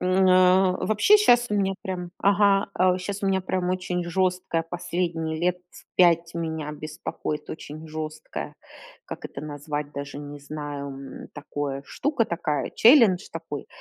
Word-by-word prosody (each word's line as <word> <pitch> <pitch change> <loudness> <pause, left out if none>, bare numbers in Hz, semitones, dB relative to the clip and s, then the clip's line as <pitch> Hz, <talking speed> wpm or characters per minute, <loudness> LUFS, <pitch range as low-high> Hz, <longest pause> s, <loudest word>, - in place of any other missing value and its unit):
М, 185 +1 +3
на 185 0 +5
вообще 215 - +5
щас 245 - +5
у - - +1
меня 195 -1 +1
прям, 180 -2 -4
ага, 200 0 +3
а, 185 0 +4
у 185 - -1
щас 200 +2 -5
у - - +1
меня 190 -1 +2
прям 185 -1 -2
очень 180 -1 -2
жёсткая 180 -1 0
последние 165 -2 -2
лет 180 +2 +1
с - - -15
5 170 -2 +4
меня 160 -3 -3
беспокоит 150 0 -5
очень 155 0 -8
жёсткая, 155 0 -6 0.5
как - - -8
это - - -7
назвать, 145 0 -5
даже 140 0 -6
не 145 0 -8
знаю, 145 -1 -6
м, 135 -1 -9
такое, 145 -2 -4
штука 280 -5 0
такая, 155 -6 -2
challenge 225 -7 +6
такой. - - -6
175 Hz, 155 wpm, -25 LUFS, 150-190 Hz, 0.5 s, challenge